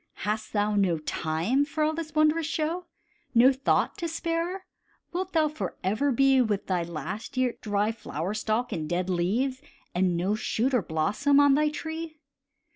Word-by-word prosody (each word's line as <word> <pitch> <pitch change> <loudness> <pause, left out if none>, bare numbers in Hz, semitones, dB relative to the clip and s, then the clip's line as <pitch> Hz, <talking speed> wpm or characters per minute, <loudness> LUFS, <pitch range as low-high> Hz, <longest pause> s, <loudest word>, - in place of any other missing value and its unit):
Hast 215 +1 -2
thou 210 0 +1
no 190 -5 +2
time 160 - 0
for 305 +2 -2
all 310 +1 +2
this 315 -1 -6
wondrous 310 +1 +3
show, 325 +3 -2 0.5
No 250 +4 +7
thought 265 +1 +1
to 340 - -2
spare? 335 +3 -2 0.5
Wilt 370 +1 -3
thou 315 -2 +4
forever 280 -4 -1
be 270 +1 +4
With 210 -5 0
thy 185 -2 0
last 170 - -6
year's 255 -2 0
dry 205 0 0
flower 185 -4 -4
stalk 215 +3 -1
and 155 -2 -3
dead 180 +1 -1
leaves, 235 +10 0 0.3
And 180 -1 +1
no 180 +3 -1
new 210 - +2
shoot 245 +4 0
or 250 - +3
blossom 200 - +2
on 285 -1 +6
thy 300 +2 +3
tree? 320 +1 -6
250 Hz, 170 wpm, -27 LUFS, 195-305 Hz, 0.5 s, No